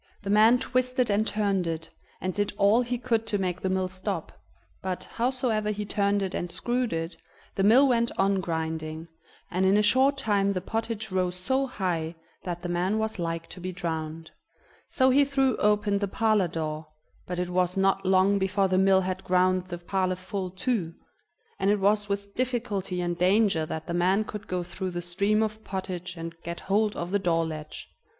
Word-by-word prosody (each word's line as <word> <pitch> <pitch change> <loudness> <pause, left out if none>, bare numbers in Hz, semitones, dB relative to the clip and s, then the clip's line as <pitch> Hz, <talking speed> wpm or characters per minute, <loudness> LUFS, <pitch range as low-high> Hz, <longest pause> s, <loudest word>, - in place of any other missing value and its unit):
The 200 - -2
man 220 +4 +6
twisted 255 -1 0
and 215 +2 +2
turned 200 -4 0
it, 165 0 -3 0.3
and 185 0 -2
did 205 +1 -1
all 205 +4 +5
he 245 0 -2
could 230 -2 0
to 210 - 0
make 185 -2 -2
the 190 - -1
mill 185 0 0
stop, 185 -2 -4 0.5
but, 185 -1 -3
howsoever 240 -3 -1
he 210 0 -2
turned 200 0 +1
it 190 - -3
and 175 - -3
screwed 245 +3 -1
it, 165 +1 -3 0.4
the - - -1
mill 240 +8 +6
went 235 -2 +2
on 195 0 +2
grinding, 160 -1 -3 0.4
and 185 +1 0
in 190 +2 +4
a 210 - +3
short 265 +5 +4
time 200 -5 +1
the 185 - -1
pottage 220 +1 -3
rose 180 -1 0
so 265 +9 0
high 175 -8 -2 0.3
that 175 -1 -5
the - - -2
man 180 +4 0
was 220 -2 -2
like 165 -1 -2
to - - -9
be 185 +1 -3
drowned. 160 -3 -4 0.6
So 260 -1 +3
he 280 +2 +5
threw 270 -3 +2
open 210 -1 +2
the 200 - -1
parlor 215 -2 +2
door, 155 -1 -4 0.4
but 180 - -4
it 180 0 -2
was 180 +1 0
not 195 0 +2
long 190 +1 +3
before 195 +1 +1
the 185 0 +2
mill 190 0 +5
had 185 +1 -3
ground 185 0 +2
the 175 -1 -5
parlor 185 +1 -1
full 185 0 -4
too, 185 -3 -2 0.6
and 195 - +2
it 205 0 +3
was 205 +1 +2
with 200 0 -3
difficulty 220 -8 -2
and 175 -1 -2
danger 185 -3 +3
that 160 0 -5
the 170 - -4
man 185 +4 +2
could 210 -1 -8
go 180 -1 -2
through 185 +2 -5
the 175 -1 -4
stream 200 +5 +1
of 215 0 -4
pottage 180 -2 -5
and 165 0 -7
get 170 0 -6
hold 210 +2 +1
of 175 +1 -4
the 200 - +2
door 165 -3 +1
latch. 155 -1 -7
190 Hz, 195 wpm, -27 LUFS, 175-215 Hz, 0.6 s, man